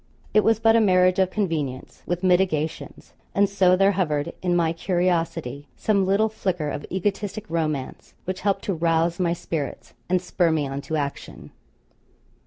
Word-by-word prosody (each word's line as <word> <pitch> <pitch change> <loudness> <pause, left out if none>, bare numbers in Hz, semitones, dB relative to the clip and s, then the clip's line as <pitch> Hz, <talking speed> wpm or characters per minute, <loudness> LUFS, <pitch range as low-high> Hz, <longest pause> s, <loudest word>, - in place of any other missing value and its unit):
It 215 - +5
was 225 -1 +3
but 225 0 +4
a 230 - +5
marriage 185 -2 +4
of 190 -1 +3
convenience, 160 -10 -3
with 175 +1 -2
mitigations. 180 -4 0 0.2
And 200 0 +4
so 190 -2 +3
there 195 +2 +4
hovered 155 -7 -1
in 180 -1 +1
my 165 -2 +2
curiosity 165 -6 -1
some 200 -3 +1
little 200 +3 +3
flicker 180 -8 -2
of 145 - -5
egotistic 200 +2 -2
romance, 155 -5 -3
which 185 +1 -4
helped 200 -1 0
to 195 - -1
rouse 165 +1 +1
my 170 -2 +1
spirits, 155 -5 -5 0.2
and 185 0 +3
spur 180 -1 0
me 155 -3 0
on 135 +1 -4
to 155 +3 -4
action. 140 -2 -5
180 Hz, 165 wpm, -24 LUFS, 160-195 Hz, 0.2 s, It